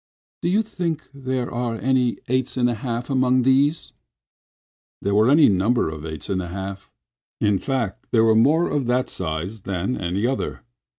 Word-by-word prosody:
"Do 170 - 0
you 210 +5 +3
think 170 -7 -3
there 130 -3 -3
are 120 -1 -2
any 125 0 +1
eights 130 +1 -1
and 120 -1 +3
a 120 - +1
half 120 +1 -4
among 130 -1 +3
these?" 140 +5 +2 1.1
There 100 - -1
were 110 +4 +4
any 150 +2 +6
number 100 -1 +2
of 80 0 -7
eights 80 -1 -7
and 95 -1 -1
a 90 - -5
half. 95 +1 -6 0.5
In 105 -2 +2
fact, 120 -8 -3
there 115 -2 +3
were 110 0 +5
more 150 +10 +4
of 145 -4 -1
that 125 +1 +1
size 90 +5 -4
than 95 +5 -2
any 95 +4 -2
other. 130 +2 -2
120 Hz, 175 wpm, -23 LUFS, 100-130 Hz, 1.1 s, any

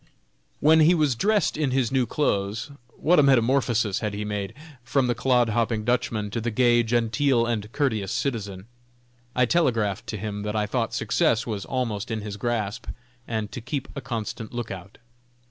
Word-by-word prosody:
When 160 +2 +6
he 160 +3 +6
was 150 -5 +2
dressed 205 - +1
in 150 -3 0
his 130 -2 +1
new 130 -3 +2
clothes, 110 -2 -1 0.3
what 175 +1 +4
a - - +8
metamorphosis 120 -5 +3
had 105 -2 -3
he 105 +1 -3
made, 100 -2 -4 0.3
from 130 +1 +1
the 120 - +1
clod 125 0 +2
hopping 115 0 0
Dutchman 115 -4 0
to 115 - -2
the 120 - -1
gay, 120 +1 +4
genteel 120 +2 +2
and 110 -2 -2
courteous 110 -10 0
citizen! 100 -8 -3 0.7
I 125 - +4
telegraphed 115 - +1
to 110 - -4
him 105 0 -4
that 105 +1 -3
I 105 -1 +1
thought 115 +1 -2
success 115 0 +1
was 105 -4 -4
almost 115 -5 -2
in 110 -2 -2
his 105 -1 -6
grasp, 115 0 -2 0.4
and 110 -2 -3
to 125 - -6
keep 140 +3 -4
a 140 - -4
constant 115 -2 -5
lookout. 100 -5 -6
115 Hz, 175 wpm, -25 LUFS, 105-130 Hz, 0.7 s, a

